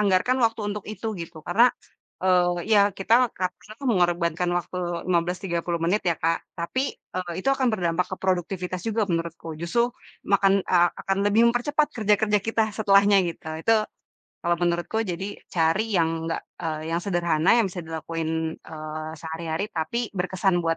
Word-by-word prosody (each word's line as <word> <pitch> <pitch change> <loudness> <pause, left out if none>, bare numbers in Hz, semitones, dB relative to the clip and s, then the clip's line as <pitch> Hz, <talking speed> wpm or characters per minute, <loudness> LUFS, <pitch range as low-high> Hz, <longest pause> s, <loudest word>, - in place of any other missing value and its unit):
anggarkan 210 +6 +2
waktu 230 -1 +2
untuk 210 -1 -6
itu 220 +1 -4
gitu. 160 -2 -9
Karena 230 +8 +5 0.5
e - - 0 0.4
ya 210 -2 +7 0.2
kita 205 +4 +3 0.2
kalau 185 0 0
bisa 215 - -13
tuh 275 - -4
mengorbankan 175 -3 +1
waktu 180 - -7 0.3
15, 175 +1 +1
30 170 -1 -1
menit 200 +5 +2
ya 170 - +3
Kak, 165 +1 +1 0.2
tapi 260 +11 -1
e 185 - -9 0.2
itu - - 0
akan 260 -1 0
berdampak 180 -3 0
ke - - -16
produktivitas 185 0 -1
juga 220 0 +1
menurutku. 165 -1 -3
Justru 235 +8 +1 0.4
makan 195 -1 +4
e 185 - +2 0.3
akan 195 0 0
lebih 210 +3 +4
mempercepat 295 +5 +1
kerja-kerja 210 -1 +3
kita 225 +2 +1
setelahnya 200 -1 +5
gitu. 160 -1 -7
Itu 225 - +4 0.7
kalau 170 0 +2
menurutku 175 +5 0
jadi 195 0 -5
cari 165 +5 +2
yang 165 -1 +3 0.2
nggak 165 - -2 0.2
e - - -2 0.3
yang 170 - +1
sederhana 175 -3 +2
yang 230 - +4
bisa 180 - -5
dilakuin, 160 0 -3
eee, 155 0 -7
sehari-hari 160 +2 -3
tapi 160 +8 -2 0.2
berkesan 185 0 +1
buat 165 0 +1
180 Hz, 160 wpm, -25 LUFS, 165-210 Hz, 0.7 s, ya